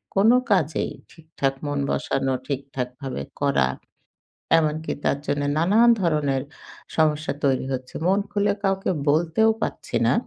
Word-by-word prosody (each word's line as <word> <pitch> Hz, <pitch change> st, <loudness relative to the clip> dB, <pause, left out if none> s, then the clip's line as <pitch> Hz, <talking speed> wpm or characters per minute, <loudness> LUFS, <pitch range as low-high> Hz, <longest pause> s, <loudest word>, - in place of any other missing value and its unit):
কোন 200 Hz, +3 st, +5 dB, 0.2 s
কাজেই 160 Hz, -6 st, +1 dB, 0.2 s
ঠিকঠাক 155 Hz, -4 st, -3 dB
মন 145 Hz, 0 st, -1 dB
বসানো 135 Hz, -1 st, 0 dB
ঠিকঠাক 135 Hz, -2 st, -3 dB
ভাবে 130 Hz, -, -4 dB, 0.2 s
করা 65 Hz, -1 st, +3 dB, 0.9 s
এমনকি 155 Hz, 0 st, -1 dB
তার -, -, +1 dB
জন্য 145 Hz, -, 0 dB, 0.2 s
নানান 210 Hz, +9 st, +5 dB
ধরনের 150 Hz, -6 st, +1 dB, 0.5 s
সমস্যা 155 Hz, -1 st, +2 dB
তৈরি 135 Hz, -2 st, +2 dB
হচ্ছে। 130 Hz, 0 st, -6 dB
মন 195 Hz, +2 st, +3 dB
খুলে 205 Hz, 0 st, +1 dB
কাউকে 195 Hz, -1 st, +1 dB, 0.2 s
বলতেও 165 Hz, +8 st, +3 dB
পারছি -, -, -2 dB
না। -, -, +4 dB
155 Hz, 130 wpm, -24 LUFS, 135-185 Hz, 0.9 s, কোন